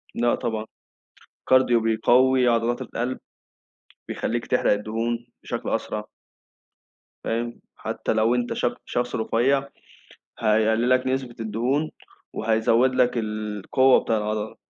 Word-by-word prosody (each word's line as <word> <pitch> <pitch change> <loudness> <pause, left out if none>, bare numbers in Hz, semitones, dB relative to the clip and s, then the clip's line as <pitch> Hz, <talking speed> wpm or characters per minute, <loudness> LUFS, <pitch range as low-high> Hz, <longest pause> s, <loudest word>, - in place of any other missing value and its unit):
لأ 120 0 +2
طبعًا 110 -2 -3 0.7
الكارديو 130 -2 +4
بيقوي 125 +3 +3
عضلات 115 0 +1
القلب، 125 +2 -3 0.9
بيخلّيك 120 0 -2
تحرق - - +2
الدهون 115 +3 -2 0.2
بشكل - - -5
أسرع. - - -2 1.2
فاهم؟ 120 +1 -3
حتّى - - -3
لو 110 +2 +2
أنت 120 -1 -1
ش - - -2 0.2
شخص 120 0 -2
رفيع 135 +5 +1 0.7
هيقلل 110 +2 +2
لك 130 0 +3
نسبة 130 -2 -2
الدهون، 120 +8 -1 0.4
وهيزود 115 +3 +2
لك 125 -1 +4
القوّة 110 +4 +2
بتاع 110 - +1
العضلة، 105 0 -3
120 Hz, 110 wpm, -24 LUFS, 110-125 Hz, 1.2 s, الكارديو